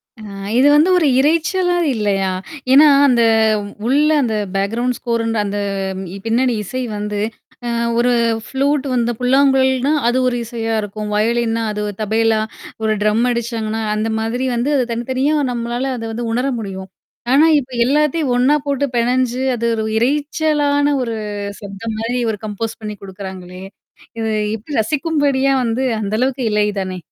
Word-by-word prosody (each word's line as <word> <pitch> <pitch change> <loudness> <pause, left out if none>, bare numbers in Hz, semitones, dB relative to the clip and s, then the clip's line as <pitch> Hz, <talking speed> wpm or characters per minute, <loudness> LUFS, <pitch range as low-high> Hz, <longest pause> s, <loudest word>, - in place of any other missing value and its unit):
அ 225 - -14 0.4
இது 265 +3 +5
வந்து 305 +5 +5
ஒரு 325 -4 +3
இரைச்சலா 335 +5 +2 0.2
இல்லையா? 200 -3 0 0.4
ஏன்னா, 295 +3 +8 0.2
அந்த 245 -3 +3 0.7
உள்ள 290 +4 +3
அந்த 230 -4 0 0.2
பேக்ரவுண்ட் 230 +6 0
ஸ்கோர்ன் 230 -1 -1
அந்த 205 0 -3 0.7
பின்னணி 240 +2 +2
இசை 255 +6 -4 0.2
வந்து, 210 0 -3 0.5
அ - - -1 0.3
ஒரு 245 +1 +3 0.3
ஃப்ளூட் 280 +1 0
வந்த 240 -1 +1
புல்லாங்குழல்னா, 265 +1 +3
அது 240 +2 +2
ஒரு 245 -1 0
இசையா 225 -1 -3
இருக்கும். 210 +1 -5
வயலின்னா 230 +1 +1
அது 210 0 -3 0.2
தபைலா 220 +1 +2 0.4
ஒரு 220 0 +2
ட்ரம் 215 +2 +2
அடிச்சாங்கன்னா, 225 -2 -2
அந்த 215 +1 -1
மாதிரி 230 +4 -2
வந்து 240 +5 0
அது 255 - +1
தனித்தனியா 260 +5 0 0.2
நம்மளால 240 +2 -2
அத 225 - -6
வந்து 235 +1 -4
உணர 250 +3 0
முடியும். 190 -3 -6 0.4
ஆனா, 290 +4 +6
இப்ப 260 -1 -9
எல்லாத்தையும் 300 +1 +1
ஒண்ணா 260 +4 +4
போட்டு 280 0 +1
பெணஞ்சு 250 +1 +1
அது 235 0 -1 0.3
இரைச்சலான 290 +2 +1 0.2
ஒரு 230 -2 -3 0.5
சப்தம் 205 +2 -6
மாரி 235 +3 -1
ஒரு 210 - -5
கம்போஸ் 215 +2 -4
பண்ணி 210 -1 -5
குடுக்குறாங்களே. 190 -1 -8 0.6
இது 220 -1 -1 0.2
எப்படி 240 +7 -6
ரசிக்கும்படியா 285 +1 +1
வந்து 235 +2 -1 0.2
அந்த 205 0 -3
அளவுக்கு 255 +1 0
இல்லை 210 0 +2
தானே? 185 -1 -4
240 Hz, 140 wpm, -18 LUFS, 220-270 Hz, 0.7 s, ஏன்னா